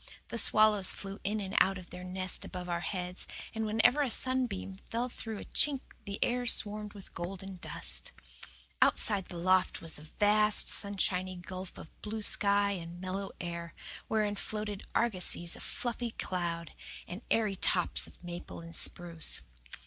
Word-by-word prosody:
The 235 - -1
swallows 215 -4 +5
flew 195 0 -5
in 210 +2 0
and 195 0 -4
out 195 +1 +4
of 180 -1 -11
their 180 0 -7
nest 185 0 +3
above 180 -1 -6
our 170 -1 0
heads, 180 +1 -2 0.3
and 220 -1 -1
whenever 225 +6 +4
a 275 - +2
sunbeam 245 -7 +1
fell 240 +2 -1
through 225 -2 -6
a - - -7
chink 280 -3 +2 0.2
the 200 0 -4
air 245 0 0
swarmed 210 -2 -1
with 200 -2 -12
golden 190 +2 -6
dust. 60 - -2 0.7
Outside 200 -4 +4
of - - -20
the 175 - -7
loft 185 +2 +3
was 165 -2 0
a 155 +1 -14
vast, 210 0 +5
sunshiny 190 -2 +1
gulf 185 +1 -7
of - - -12
blue 215 0 -4
sky 200 0 +3
and 175 -2 -5
mellow 190 +1 -3
air, 170 -1 -5 0.3
wherein 210 -2 +1
floated 210 0 -3
argosies 180 -6 +1
of - - -10
fluffy 240 0 -2
cloud, 170 -5 -3 0.3
and 180 +5 -6
airy 215 -3 +2
tops 180 -1 +2
of - - -18
maple 175 0 -7
and 165 0 -9
spruce. 170 - +1
195 Hz, 165 wpm, -32 LUFS, 180-215 Hz, 0.7 s, swallows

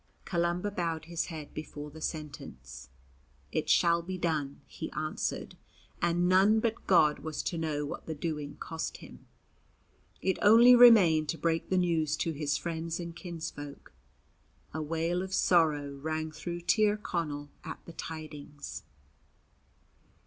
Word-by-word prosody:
Columba 175 +2 0
bowed 165 -4 -2
his 170 0 -2
head 155 -3 -8
before 150 -1 -7
the 160 +2 -11
sentence. 65 - -7 0.6
"It - - -2
shall 170 0 +4
be 185 +2 -5
done," 155 -5 -2
he - - -7
answered, - - -3 0.5
and 175 +1 +2
none 195 +4 +5
but 225 0 -2
God 155 -5 +5
was 155 -1 -4
to 170 - -2
know 150 -2 -1
what 145 - -7
the 160 - -3
doing 150 -2 -4
cost 160 0 -5
him. - - -14 0.9
It 190 - 0
only 230 +4 +8
remained 190 -11 +7
to 165 - -1
break 165 +1 -1
the 185 - +2
news 160 -4 +1
to 165 - -1
his 150 -1 -1
friends 165 0 -3
and 170 -1 -6
kinsfolk. 160 - -7 0.8
A 160 - -3
wail 165 +3 -1
of 190 0 -3
sorrow 155 -7 +3
rang 155 +3 -3
through 170 +2 -5
Tir 210 +3 +3
Connell 150 -8 -4
at - - -7
the 170 - -10
tidings. 150 -3 -7
165 Hz, 140 wpm, -30 LUFS, 150-175 Hz, 0.9 s, only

